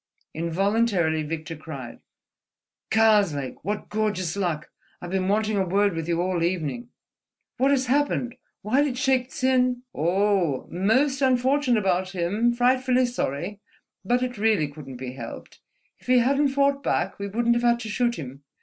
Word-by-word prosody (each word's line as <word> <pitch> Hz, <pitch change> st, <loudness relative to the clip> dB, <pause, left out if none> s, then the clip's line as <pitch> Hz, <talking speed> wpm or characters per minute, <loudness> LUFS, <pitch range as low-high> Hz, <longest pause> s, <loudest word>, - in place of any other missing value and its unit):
Involuntarily 175 Hz, 0 st, +1 dB
Victor 160 Hz, +1 st, -5 dB
cried: 140 Hz, -6 st, -9 dB, 0.9 s
"Karslake!" 205 Hz, -11 st, +2 dB
"What 205 Hz, +4 st, -4 dB
gorgeous 205 Hz, -5 st, -1 dB
luck! 175 Hz, -6 st, -2 dB, 0.3 s
I've 175 Hz, -, -8 dB
been 190 Hz, -1 st, 0 dB
wanting 215 Hz, +1 st, +1 dB
a 195 Hz, -, +2 dB
word 200 Hz, +2 st, +1 dB
with 165 Hz, -1 st, -4 dB
you 170 Hz, -1 st, 0 dB
all 180 Hz, -2 st, -1 dB
evening." 180 Hz, +7 st, -2 dB, 0.7 s
"What 265 Hz, +2 st, +3 dB
has 270 Hz, -2 st, +2 dB
happened? 255 Hz, -2 st, 0 dB, 0.3 s
Why 255 Hz, +7 st, +2 dB
did 280 Hz, -4 st, -1 dB
Shaik 255 Hz, -1 st, +1 dB
Tsin—?" 255 Hz, -2 st, +1 dB
"Oh, 180 Hz, -3 st, +1 dB
most 260 Hz, +10 st, +1 dB
unfortunate 260 Hz, -1 st, +2 dB
about 190 Hz, -1 st, 0 dB
him—frightfully 245 Hz, +7 st, +2 dB
sorry, 200 Hz, -, -3 dB, 0.4 s
but 245 Hz, +5 st, +1 dB
it 245 Hz, -4 st, -4 dB
really 210 Hz, -8 st, +2 dB
couldn't 140 Hz, -3 st, -10 dB
be 125 Hz, 0 st, -6 dB
helped, 135 Hz, -, -9 dB, 0.4 s
if -, -, -21 dB
he 255 Hz, 0 st, +5 dB
hadn't 275 Hz, +4 st, +3 dB
fought 275 Hz, 0 st, +1 dB
back -, -, -1 dB
we 200 Hz, -, -3 dB
wouldn't 235 Hz, +4 st, +1 dB
have 235 Hz, -, 0 dB
had 235 Hz, 0 st, +3 dB
to 220 Hz, -, -6 dB
shoot 240 Hz, +2 st, 0 dB
him. 135 Hz, -, -8 dB
210 Hz, 150 wpm, -25 LUFS, 170-250 Hz, 0.9 s, he